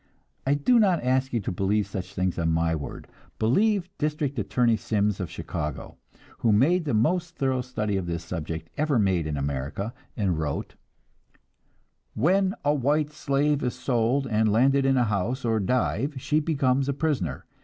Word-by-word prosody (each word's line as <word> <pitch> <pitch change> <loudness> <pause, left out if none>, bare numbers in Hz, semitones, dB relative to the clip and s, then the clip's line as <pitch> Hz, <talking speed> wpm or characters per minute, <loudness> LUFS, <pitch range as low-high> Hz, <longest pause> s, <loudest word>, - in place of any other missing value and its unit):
I 140 - +4
do 235 - +3
not 185 - +3
ask 130 +1 +1
you 120 - 0
to - - -3
believe 100 +3 +1
such 95 -3 -6
things 90 -1 -1
on 80 -1 +1
my 80 0 +1
word; 75 -3 -6 0.3
believe 195 - +2
District 150 -3 -1
Attorney 115 +2 +2
Sims 105 -2 0
of 90 - -3
Chicago, 75 -2 -5 0.4
who 115 - +2
made 160 - +3
the 140 - 0
most 170 +9 +1
thorough 130 -4 0
study 105 -5 -2
of 90 -2 -3
this 85 -1 -3
subject 80 -1 -5
ever 150 -3 +1
made 95 -7 +1
in 75 -1 -2
America, 70 - -3 0.2
and 95 -7 0
wrote: 75 -3 -3 1.4
"When 190 - +2
a 145 - +4
white 150 +2 +1
slave 145 0 0
is 125 -1 -1
sold 125 +1 +1
and 110 -2 +2
landed 135 +5 +3
in 135 -1 +3
a 125 - +4
house 115 +4 -1
or 115 -1 +2
dive 125 - 0
she 150 +4 +1
becomes 140 -3 +1
a - - +1
prisoner.... 150 0 -2
125 Hz, 170 wpm, -26 LUFS, 95-145 Hz, 1.4 s, I